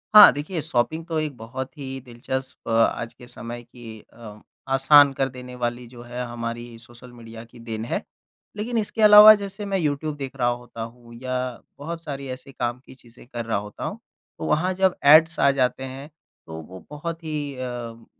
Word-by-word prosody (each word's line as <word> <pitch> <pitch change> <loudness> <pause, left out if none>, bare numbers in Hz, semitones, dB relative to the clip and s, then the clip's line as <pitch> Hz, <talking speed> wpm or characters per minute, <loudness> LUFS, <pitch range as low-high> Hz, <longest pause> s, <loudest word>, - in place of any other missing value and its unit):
हाँ, 210 - +12
देखिए 155 +4 -4
शॉपिंग 155 +3 -1
तो 165 -2 -1
एक 155 -3 -3
बहुत 130 +6 -7
ही 135 -2 -6
दिलचस्प 130 +1 -6
आज 115 0 +1
के 120 +1 -15
समय 120 0 -7
की 115 -2 -12
अ, 110 -2 -11 0.3
आसान 140 +2 +6
कर 135 0 +1
देने 125 0 -10
वाली 120 0 -3
जो 120 0 -13
है 120 +1 -5
हमारी 120 0 -6
सोशल 120 +1 -14
मीडिया 115 -1 -10
की 120 +1 -17
देन 115 -1 -5
है। - - -2 0.6
लेकिन 230 +3 -2
इसके 220 +1 -1
अलावा 210 0 +11
जैसे 200 0 -6
मैं 195 -1 -1
यूट्यूब 150 -2 -1
देख 135 -2 -6
रहा 125 -2 +1
होता 120 -1 -6
हूँ 115 +1 -9
या 130 0 -2 0.4
बहुत 165 +3 -6
सारी 140 -2 -6
ऐसे 130 +2 -8
काम 120 -1 -3
की - - -14
चीज़ें 120 -1 -18
कर 120 -2 -5
रहा 110 -2 0
होता 105 +1 -7
हूँ, - - -4 0.4
तो 80 - -4
वहाँ 170 - +1
जब 190 0 +2
एड्स 160 +3 +7
आ - - +5
जाते 130 -1 0
हैं 135 +2 -8 0.4
तो 80 0 -7
वो 90 +3 -12
बहुत 165 +3 -6
ही 150 -3 -4
अ, 120 -2 -6
130 Hz, 190 wpm, -24 LUFS, 120-150 Hz, 0.6 s, हाँ